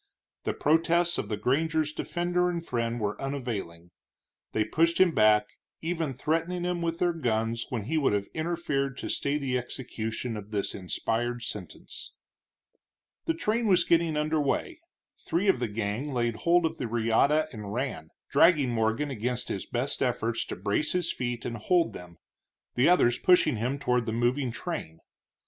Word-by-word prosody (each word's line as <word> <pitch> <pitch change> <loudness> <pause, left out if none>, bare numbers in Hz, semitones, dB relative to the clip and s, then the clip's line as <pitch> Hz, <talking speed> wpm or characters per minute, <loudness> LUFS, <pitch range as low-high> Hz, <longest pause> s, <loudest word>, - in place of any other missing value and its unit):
The - - -1
protests 170 +3 +2
of - - -4
the 105 - -1
granger's 155 +6 +1
defender 175 +2 0
and 170 -1 -3
friend 120 -2 -1
were 105 -1 -2
unavailing. 110 -11 -4 0.6
They 110 - +1
pushed 165 +9 +2
him 185 -2 +6
back, 105 -5 +4 0.3
even 160 -5 -2
threatening 165 +6 -1
him 175 -1 -1
with 165 0 -1
their 175 0 +2
guns 115 -6 -1
when 120 -6 -2
he 155 +9 0
would 140 - +2
have 100 -1 0
interfered 155 -5 -1
to - - -5
stay 140 +1 0
the 130 -3 0
execution 120 -1 -5
of 105 -1 -7
this 105 -2 -2
inspired 115 +5 -2
sentence. 100 -7 -7 1.1
The 165 - 0
train 220 +6 0
was 180 -3 +5
getting 165 -2 +2
under 155 0 +1
way; 315 - -1 0.4
three 185 +5 -1
of 190 - +4
the 120 - 0
gang 110 +6 -3
laid 120 -3 0
hold 170 +4 +3
of 160 - -2
the 125 - -2
reata 120 +7 +2
and 105 -3 -6
ran, 120 - -3 0.2
dragging 150 -7 +5
Morgan 115 +5 0
against 125 +1 -2
his 95 - -3
best 125 +4 -2
efforts 120 -3 0
to - - -5
brace 100 +10 0
his 180 -2 0
feet 120 -1 -3
and 120 -1 -3
hold 170 - +2
them, 90 -1 -10 0.6
the 125 +6 +4
others 120 -9 +4
pushing 175 -8 +4
him 125 +6 -1
toward 125 -4 0
the 110 - -1
moving 120 +3 +1
train. 115 - -5
130 Hz, 165 wpm, -28 LUFS, 115-165 Hz, 1.1 s, him